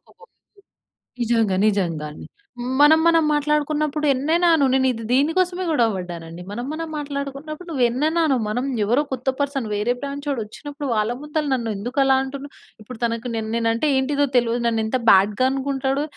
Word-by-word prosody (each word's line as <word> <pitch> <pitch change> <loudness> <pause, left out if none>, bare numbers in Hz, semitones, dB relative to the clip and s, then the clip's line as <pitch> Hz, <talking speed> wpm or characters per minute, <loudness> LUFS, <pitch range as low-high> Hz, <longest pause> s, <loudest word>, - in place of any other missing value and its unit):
ఒక 455 - -19 1.0
నిజంగా. 225 -5 +1
నిజంగా 170 -7 0
అండి. - - -11 0.6
మనం 315 +2 +7
మనం 330 -1 +4
మాట్లాడుకున్నప్పుడు 300 0 0
ఎన్నైనా 320 +7 +1
అను. 285 -3 +3
నేను 260 0 +3
ఇది 230 -1 -6
దీని 280 +5 +3
కోసమే 370 0 +1
గొడవ 235 -7 +3
పడ్డానండి. 175 -2 -7
మనం 240 +4 -4
మనం 325 +1 -4
మాట్లాడుకున్నప్పుడు 290 +3 -5
నువ్వు 275 -6 0
ఎన్నన్నా 310 +7 0
అను. 270 - +2
మనం 245 +5 -1 0.2
ఎవరో 240 +7 +2
కొత్త 260 +1 -2
పర్సన్ 280 -5 -1
వేరే 210 +4 0
బ్రాంచోడు 280 -1 -3
వచ్చినప్పుడు 285 +6 -7
వాళ్ళ 215 +2 +1
ముందుల 300 +1 -2
నన్ను 230 -3 -1
ఎందుకు 245 +7 -3
అలా 270 0 +4
అంటున్నా? 280 +1 -7 0.3
ఇప్పుడు 225 +2 -10
తనకు 230 +1 -1
నెన్ 220 -1 -3
నేను 230 -1 +1
అంటే 295 +7 0
ఏంటిదో 285 +2 +1
తెలవదు. 235 0 +1
నన్ను 225 -1 0
ఎంత 255 +3 -1
బ్యాడ్‌గా 205 +5 +4
అనుకుంటాడు. 270 +1 -1
265 Hz, 165 wpm, -22 LUFS, 230-295 Hz, 1.0 s, మనం